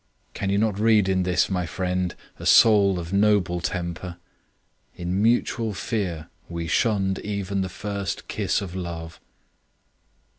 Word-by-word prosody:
Can 95 - -3
you 100 - +2
not 105 -1 +1
read 110 -3 +4
in 95 -1 +2
this, 90 -1 +2
my 90 -3 -2
friend, 90 0 -2 0.2
a - - -7
soul 100 -4 +6
of 85 +1 -5
noble 100 -4 +2
temper? 85 0 -4 0.8
In 90 +3 -2
mutual 115 -1 +1
fear 85 -5 -3 0.2
we 85 -1 -4
shunned 95 +3 +1
even 100 -1 -2
the 95 - -2
first 100 -1 -4
kiss - - -1
of 95 -2 -6
love. 85 -3 -6
95 Hz, 140 wpm, -24 LUFS, 90-100 Hz, 0.8 s, soul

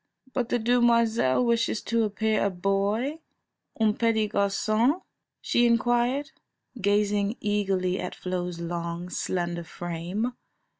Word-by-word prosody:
"But 245 -3 -1
the - - +2
demoiselle 235 - +3
wishes 230 -2 +1
to 230 -1 +1
appear 215 +1 0
a 200 - +2
boy, 200 - 0 0.6
un 220 -1 +3
petit 220 -1 +1
garcon?" 215 - +1 0.4
she 240 0 +3
inquired, 240 +5 +1 0.5
gazing 205 +1 +1
eagerly 195 -3 0
at 180 - -4
Flo's 180 -1 -4
long, 170 +1 -4
slender 175 -2 -2
frame. 175 +8 -4
210 Hz, 110 wpm, -27 LUFS, 185-235 Hz, 0.6 s, demoiselle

